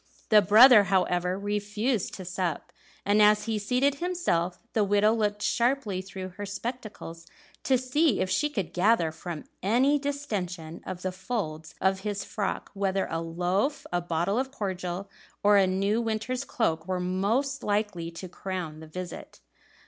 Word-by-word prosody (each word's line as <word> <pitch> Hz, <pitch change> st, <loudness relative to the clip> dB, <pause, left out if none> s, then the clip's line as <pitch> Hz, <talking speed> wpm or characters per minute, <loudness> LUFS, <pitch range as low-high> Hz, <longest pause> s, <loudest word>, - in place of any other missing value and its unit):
The 215 Hz, -3 st, +7 dB
brother, 215 Hz, +2 st, +8 dB
however, 180 Hz, -1 st, +1 dB
refused 210 Hz, +2 st, -1 dB
to 190 Hz, -, -8 dB
sup; 180 Hz, -2 st, -3 dB, 0.3 s
and 205 Hz, +1 st, +4 dB
as 210 Hz, 0 st, +5 dB
he 220 Hz, -1 st, -1 dB
seated 255 Hz, +7 st, +1 dB
himself 340 Hz, -, 0 dB, 0.2 s
the 220 Hz, -, +3 dB
widow 205 Hz, +2 st, +3 dB
looked 210 Hz, -2 st, -1 dB
sharply 235 Hz, -6 st, +1 dB
through 190 Hz, 0 st, -7 dB
her 205 Hz, +3 st, -7 dB
spectacles 205 Hz, -6 st, -6 dB, 0.4 s
to 265 Hz, -, +4 dB
see 255 Hz, +1 st, +2 dB
if -, -, +1 dB
she 290 Hz, +11 st, +1 dB
could 200 Hz, -, -4 dB
gather 180 Hz, -3 st, +3 dB
from 160 Hz, 0 st, -7 dB, 0.2 s
any 260 Hz, +8 st, +3 dB
distention 195 Hz, -, -4 dB
of 185 Hz, -1 st, -6 dB
the 185 Hz, -, -1 dB
folds 180 Hz, -6 st, -4 dB
of 190 Hz, 0 st, +2 dB
his 200 Hz, 0 st, -3 dB
frock 205 Hz, -2 st, -3 dB
whether 195 Hz, -1 st, 0 dB
a 165 Hz, -, -1 dB
loaf, 180 Hz, -, -1 dB
a 175 Hz, -, +1 dB
bottle 175 Hz, +6 st, 0 dB
of 265 Hz, 0 st, -1 dB
cordial, 190 Hz, -5 st, -4 dB, 0.4 s
or 205 Hz, 0 st, +6 dB
a 195 Hz, -1 st, +5 dB
new 200 Hz, +4 st, +1 dB
winter's 230 Hz, +4 st, -2 dB
cloak 165 Hz, -11 st, -1 dB
were 185 Hz, -1 st, -1 dB
most 210 Hz, +10 st, 0 dB
likely 205 Hz, -5 st, -1 dB
to 170 Hz, +2 st, -8 dB
crown 180 Hz, -4 st, -5 dB
the 160 Hz, -, -10 dB
visit. 180 Hz, +2 st, -8 dB
200 Hz, 155 wpm, -27 LUFS, 180-225 Hz, 0.4 s, brother